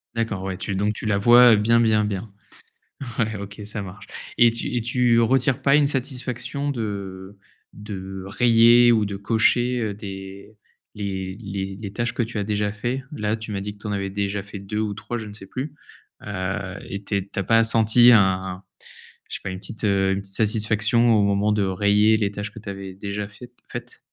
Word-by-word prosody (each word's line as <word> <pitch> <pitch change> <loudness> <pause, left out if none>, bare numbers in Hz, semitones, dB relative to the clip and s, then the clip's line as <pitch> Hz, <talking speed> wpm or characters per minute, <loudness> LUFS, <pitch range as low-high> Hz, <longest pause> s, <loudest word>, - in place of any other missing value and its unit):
D'accord. 110 -5 -2
Ouais, 95 -1 -4
tu 100 +1 -3
donc 105 +2 0
tu 105 - -7
la 105 -2 +2
vois 120 +2 +7
bien, 115 +3 +3
bien, 110 -2 +3
bien. 100 +1 -4 0.9
Ouais. 110 -2 0
OK, 100 +1 -8
ça 105 +1 -4
marche 100 +1 -9 0.3
et 120 0 +7
tu 115 +2 -4
et 120 - +1
tu 120 0 +3
retires 130 +3 +2
pas 140 +1 +5
une 145 -1 +4
satisfaction 130 0 -3
de 100 -5 -5 0.4
de 95 -2 -7
rayer 120 +3 +5
ou 110 -2 +3
de 100 -1 -4
cocher, 120 +4 +2
heu, 105 -3 -2
des 100 +1 -9 0.4
les 95 -2 -4
les 95 -2 -5
les 100 -3 -6
tâches 120 +2 -2
que - - 0
tu 115 -1 -6
as 100 - -1
déjà 105 0 -1
faits? 120 +5 -3
Là, 105 -5 -1
tu 110 -1 -7
m'as 100 - -3
dit 105 +1 -5
que - - -21
tu 105 - -9
en 105 - -2
avais 100 -1 -2
déjà 100 0 -2
fait 100 0 -9
2 100 +2 -5
ou 105 -2 -2
3, 110 +3 -5
je 110 - -6
ne - - -9
sais 100 -2 -9
plus, 135 +8 -5 0.5
heu, 95 -1 -3
et 100 +1 -6
tu - - -3
es 95 - -1
tu 100 - -7
as 100 - 0
pas 115 +4 +4
senti 115 +1 +5
un 95 -3 +2 0.7
je - - -3
sais - - -11
pas, 100 - -3
une 95 - -5
petite, 110 +3 -6
heu, 95 -2 +2
une 95 - -1
petite 100 -1 -3
satisfaction 110 +2 +2
au 105 - +4
moment 100 +1 +2
de 105 -1 +1
rayer 105 +3 +3
les 105 -2 0
tâches 105 0 -5
que 115 - -10
tu 105 -2 -11
avais 95 -1 -7
déjà 100 +1 -5
fai 115 +4 -13 0.2
faites? - - -8
105 Hz, 215 wpm, -23 LUFS, 100-115 Hz, 0.9 s, vois